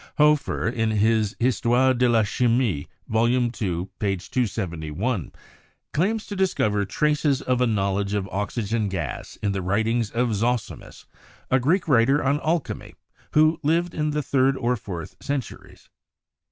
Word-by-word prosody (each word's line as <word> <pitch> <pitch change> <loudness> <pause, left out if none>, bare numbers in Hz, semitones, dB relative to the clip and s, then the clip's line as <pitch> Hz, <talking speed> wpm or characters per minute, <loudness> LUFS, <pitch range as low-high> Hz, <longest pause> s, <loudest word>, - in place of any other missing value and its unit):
Hoefer, 150 -4 +3
in 115 -1 0
his 110 0 +2
'Histoire 125 +1 +3
de 125 0 +2
la 115 -2 +4
Chimie' 115 - +1 0.2
(Vol. 115 +2 +2
II, 120 -1 +1
p. 95 0 -2
271), 90 - -2 0.6
claims 210 +7 0
to 205 - -6
discover 110 - +1
traces 150 +4 +1
of 125 -1 0
a 125 - +4
knowledge 100 -1 0
of 100 -2 -1
oxygen 105 +2 -2
gas 85 -7 -5
in 100 - +1
the 100 -1 -2
writings 110 +4 0
of 120 0 0
Zosimus, 115 +2 -3 0.5
a 130 - +4
Greek 170 +9 +1
writer 135 +2 +4
on 140 +2 +1
alchemy, 160 0 -2 0.4
who 155 +2 +4
lived 165 +3 +1
in 150 -1 -1
the 150 0 -1
third 135 0 +2
or 125 -1 +1
fourth 95 -8 -7
centuries. 140 -3 -5
120 Hz, 140 wpm, -24 LUFS, 100-135 Hz, 0.6 s, la